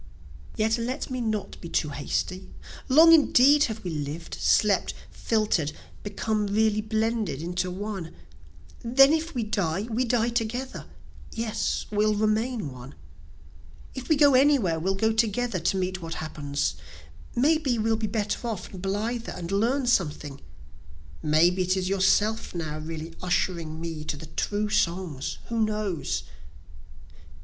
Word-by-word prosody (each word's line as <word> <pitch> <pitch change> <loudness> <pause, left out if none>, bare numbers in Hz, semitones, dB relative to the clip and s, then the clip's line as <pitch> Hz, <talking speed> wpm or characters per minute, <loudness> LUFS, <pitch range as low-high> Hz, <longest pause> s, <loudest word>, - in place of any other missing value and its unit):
Yet 220 +2 +1
let 255 +4 -3
me 255 -1 -2
not 215 -3 -3
be 170 - -7
too 155 - 0
hasty, 150 +6 -3 0.4
Long 320 +5 +8
indeed 290 -1 +6
have 220 -1 -5
we 180 - -3
lived, 150 +2 -5
slept, 205 -3 +2 0.2
filter'd, 210 -9 0 0.3
become 210 +1 -2
really 215 +1 +2
blended 220 - -1
into 180 +3 -2
one; 190 -3 -5 0.7
Then 270 +4 +5
if 320 0 -1
we 240 - 0
die 195 -4 -1
we 235 +4 +1
die 235 -1 +1
together, 235 +3 -3 0.4
(yes, 225 -1 -2
we'll 210 0 +2
remain 215 - 0
one,) 125 +2 -11 1.0
If 260 -2 -7
we 315 - +5
go 285 -1 +5
anywhere 255 - +4
we'll 190 +4 0
go 220 +3 +1
together 225 -1 0
to 175 +3 0
meet 185 0 -2
what 165 0 -5
happens, 145 -2 -2 0.6
May 300 +6 +3
be 265 -6 0
we'll 225 0 +1
be 220 0 -2
better 210 +2 -2
off 210 -5 -5
and 185 - -8
blither, 220 +5 -2
and 170 0 -6
learn 240 +7 +1
something, 150 - 0 0.8
May 155 +3 +4
be 185 +1 -2
it 185 +1 +1
is 185 0 -1
yourself 200 +2 +2
now 155 -3 -4
really 160 +1 -6
ushering 170 -3 -1
me 165 -2 -5
to 150 - -3
the 160 - -9
true 205 +6 -2
songs, 170 -7 -1
(who 230 -1 0
knows?) 210 -6 -1
210 Hz, 145 wpm, -26 LUFS, 170-230 Hz, 1.0 s, Long